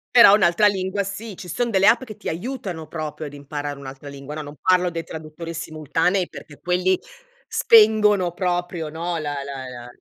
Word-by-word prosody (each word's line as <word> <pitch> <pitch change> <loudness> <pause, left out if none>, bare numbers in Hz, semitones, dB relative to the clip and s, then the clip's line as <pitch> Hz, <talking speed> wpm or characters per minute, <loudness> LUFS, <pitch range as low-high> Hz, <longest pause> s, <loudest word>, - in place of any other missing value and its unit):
Però 235 -4 +10
un'altra 200 +1 +4
lingua 195 0 -1
sì, 200 +2 -6
ci 180 - -10
son 230 +8 -1
delle 195 0 +4
app 235 +2 +5
che 220 -4 -9
ti - - -5
aiutano 185 -3 -5
proprio 155 -1 -5
ad 145 - -8
imparare 145 0 -5
un'altra 135 +1 -9
lingua. 140 +1 -8
No, 155 - -5
non 145 0 -10
parlo 180 -1 +3
dei 165 0 -4
traduttori 160 +2 -8
simultanei 165 +4 0
perché 145 - -12
quelli 180 +1 +1 0.5
spengono, 215 - +5
proprio, 175 -2 -2
no, 170 +2 -3
la 150 -2 -3
la 135 -2 -6
la 120 -1 -9
175 Hz, 180 wpm, -22 LUFS, 150-200 Hz, 0.5 s, Però